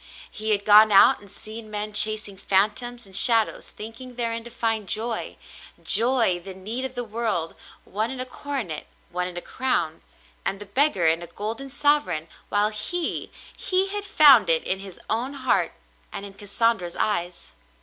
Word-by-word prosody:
He 215 0 -5
had 205 -1 0
gone 215 +1 +7
out 195 - +6
and 205 - -15
seen 215 +2 -9
men 210 0 -4
chasing 215 -1 +1
phantoms 215 +5 -1
and 190 -1 -8
shadows 225 +1 +4
thinking 230 +4 -9
therein 230 -1 -1
to 235 - -9
find 225 -4 -2
joy 225 +1 -2 0.2
— - - -19 0.2
joy 230 -7 +3
— - - -19
the 190 0 -9
need 220 +7 -4
of 260 -1 -6
the 245 - -2
world 215 -7 -2 0.2
— - - -30
one 215 +4 -2
in 265 -1 -6
a 255 - -1
coronet, 255 - -5 0.2
one 180 0 -2
in 180 -1 -8
a - - -4
crown, 175 -13 -2 0.4
and 195 - -3
the 205 - -7
beggar 205 - +1
in 165 +1 +3
a 175 - -7
golden 225 +9 -5
sovereign 290 - +1
— - - -31
while 205 +1 +2
he 320 +11 -3
— - - -19
he 380 +1 0
had 410 +1 -4
found 290 - +7
it 160 -1 +4
in 190 - -1
his 195 -2 -10
own 250 +5 -2
heart 260 -2 0 0.4
and 200 - -6
in 200 - -10
Cassandra's 205 -2 -1
eyes. 175 -4 -2
215 Hz, 190 wpm, -24 LUFS, 195-245 Hz, 0.4 s, gone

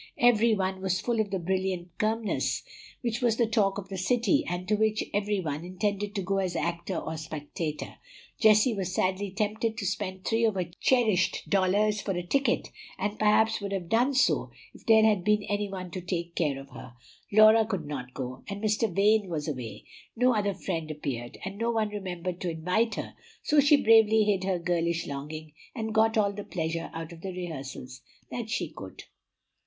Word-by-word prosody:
Every 235 -4 +4
one 190 -1 -2
was 190 -1 0
full 235 +2 -1
of 215 -2 +1
the 195 - -1
brilliant 185 -1 -2
Kirmess, 220 0 0 0.4
which 235 -1 -2
was 235 -2 +2
the 235 - +3
talk 210 -3 +1
of 195 -2 -6
the 190 -1 -4
city, 230 +2 +2
and 175 +1 -3
to 215 - +1
which 215 0 +1
every 205 0 0
one 155 -3 -3
intended 200 +3 -2
to 195 - -1
go 195 +2 0
as 185 -2 -1
actor 170 +2 -2
or 160 0 -4
spectator. 155 0 -5 0.4
Jessie 215 +2 +5
was 190 -2 -3
sadly 190 +2 0
tempted 215 +2 -1
to 210 - -3
spend 190 -1 -3
three 225 +1 +1
of 220 -3 +1
her 180 -2 -2
cherished 220 -8 +2
dollars 205 +2 +2
for 195 - -2
a 175 0 -3
ticket, 275 +9 +1 0.3
and 210 +1 -3
perhaps 220 +1 +3
would 200 -1 -4
have 185 -4 -3
done 245 +5 +2
so 265 - +2 0.2
if - - -16
there 220 -1 +7
had 210 -4 +3
been 210 +1 +2
any 205 0 -2
one 185 -2 -6
to 185 - -5
take 170 -1 -3
care 145 -6 0
of 135 0 -12
her. 125 - -10 0.4
Laura 215 +2 +7
could 195 -7 -3
not 130 -4 -6
go, 130 -1 -5
and 200 0 -4
Mr. 215 0 +1
Vane 205 +2 +3
was 155 -3 -3
away; 125 -7 -5 0.3
no 250 +2 +3
other 205 -3 0
friend 165 -4 -3
appeared, 135 -6 -5
and 195 +1 -6
no 230 +1 0
one 220 -2 +1
remembered 180 -3 -5
to 180 - -1
invite 180 +8 0
her, - - -5 0.3
so 300 - +3
she 290 +1 +6
bravely 220 -1 +6
hid 200 -3 +1
her 190 -2 +1
girlish 170 -1 0
longing, 150 +2 -6 0.2
and 220 -2 -3
got 225 0 +3
all 200 -2 +2
the 205 0 -6
pleasure 165 -2 -3
out 165 +1 -6
of 165 -1 -11
the 190 - -4
rehearsals 135 -7 -7 0.3
that 235 -2 -4
she - - -1
could. - - -10
195 Hz, 195 wpm, -28 LUFS, 170-215 Hz, 0.4 s, there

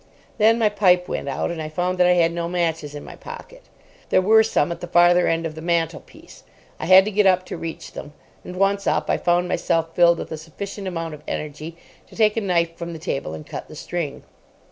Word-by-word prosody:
Then 220 +2 +5
my 220 -2 +3
pipe 180 -4 +3
went 140 - -4
out, 135 - -2
and 165 -2 -5
I 155 - -5
found 180 +3 -2
that 180 - +5
I 180 - +5
had 170 -1 +3
no 170 0 -3
matches 165 -4 -2
in 145 - -7
my - - -10
pocket. - - -11 0.5
There - - +4
were 220 +4 +5
some 195 -8 +1
at 170 0 -6
the 175 - -5
farther 175 +1 +4
end 165 0 0
of 160 - -4
the 160 - -9
mantelpiece. 165 -1 -3 0.4
I - - -4
had 190 +1 +8
to 215 - -2
get 205 0 +3
up 185 -1 +3
to - - -6
reach 165 -1 -7
them, 150 - -9 0.3
and, 180 - -8
once 195 +1 +1
up, - - +1
I - - +2
found 175 0 +1
myself 165 -2 -1
filled 170 -1 +5
with - - -7
a 160 - -4
sufficient 190 +5 -7
amount 165 -3 -4
of 150 - -10
energy 155 +2 -6 0.3
to - - -16
take 215 -2 +3
a 225 - 0
knife 170 -4 0
from 170 0 -5
the - - -6
table 135 - -4
and 75 - -9
cut - - -7
the - - -12
string. - - -5
175 Hz, 235 wpm, -22 LUFS, 165-185 Hz, 0.5 s, had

